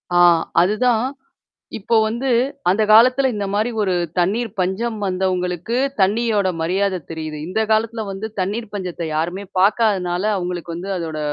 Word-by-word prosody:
ஆ -, -, +5 dB, 0.4 s
அதுதான். 225 Hz, +5 st, +2 dB, 0.7 s
இப்போ 225 Hz, +3 st, 0 dB
வந்து 235 Hz, +5 st, -2 dB, 0.4 s
அந்த 210 Hz, +3 st, +2 dB
காலத்தில 255 Hz, +4 st, +6 dB
இந்தமாரி 205 Hz, +3 st, -1 dB
ஒரு 190 Hz, -2 st, +1 dB, 0.2 s
தண்ணீர் 210 Hz, +6 st, +1 dB
பஞ்சம் 215 Hz, +5 st, -1 dB
வந்தவுங்களுக்கு 185 Hz, +2 st, -1 dB, 0.2 s
தண்ணீயோட 205 Hz, 0 st, +2 dB
மரியாத 185 Hz, +2 st, 0 dB
தெரியுது. 155 Hz, -2 st, -5 dB
இந்த 200 Hz, +5 st, -1 dB
காலத்துல 220 Hz, +1 st, +1 dB
வந்து 195 Hz, +3 st, -5 dB
தண்ணீர் 210 Hz, +4 st, -3 dB
பஞ்சத்த 180 Hz, -3 st, -4 dB
யாருமே 175 Hz, +5 st, -2 dB
பார்க்காதனால, 190 Hz, -3 st, +2 dB
அவுங்களுக்கு 175 Hz, -2 st, -4 dB
வந்து 185 Hz, +4 st, -6 dB
அதோட 160 Hz, -3 st, -4 dB
195 Hz, 125 wpm, -20 LUFS, 180-220 Hz, 0.7 s, காலத்தில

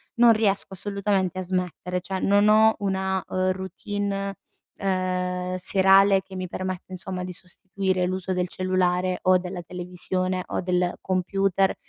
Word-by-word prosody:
non 235 Hz, -1 st, +7 dB
riesco 200 Hz, -3 st, 0 dB
assolutamente 195 Hz, -2 st, -1 dB
a -, -, -2 dB
smettere. 180 Hz, 0 st, -3 dB
Cioè 190 Hz, +2 st, -4 dB
non 205 Hz, +2 st, +4 dB
ho 220 Hz, +1 st, +6 dB
una, 190 Hz, -1 st, -1 dB
ehm, 185 Hz, 0 st, +1 dB
routine, 195 Hz, +1 st, -4 dB, 0.4 s
uhm, 185 Hz, -1 st, -1 dB
serale 195 Hz, +1 st, +5 dB
che 190 Hz, -, -12 dB
mi 185 Hz, 0 st, -4 dB
permette, 185 Hz, +1 st, -5 dB
insomma, 185 Hz, 0 st, -4 dB
di 180 Hz, -, -5 dB
sostituire 185 Hz, 0 st, -2 dB
l'uso 185 Hz, 0 st, -2 dB
del 180 Hz, 0 st, 0 dB
cellulare 185 Hz, 0 st, 0 dB
o 185 Hz, 0 st, +5 dB
della 180 Hz, 0 st, -5 dB
televisione 180 Hz, +1 st, -3 dB
o -, -, -2 dB
del 180 Hz, -1 st, 0 dB
computer 195 Hz, +1 st, +1 dB
185 Hz, 140 wpm, -25 LUFS, 180-195 Hz, 0.4 s, non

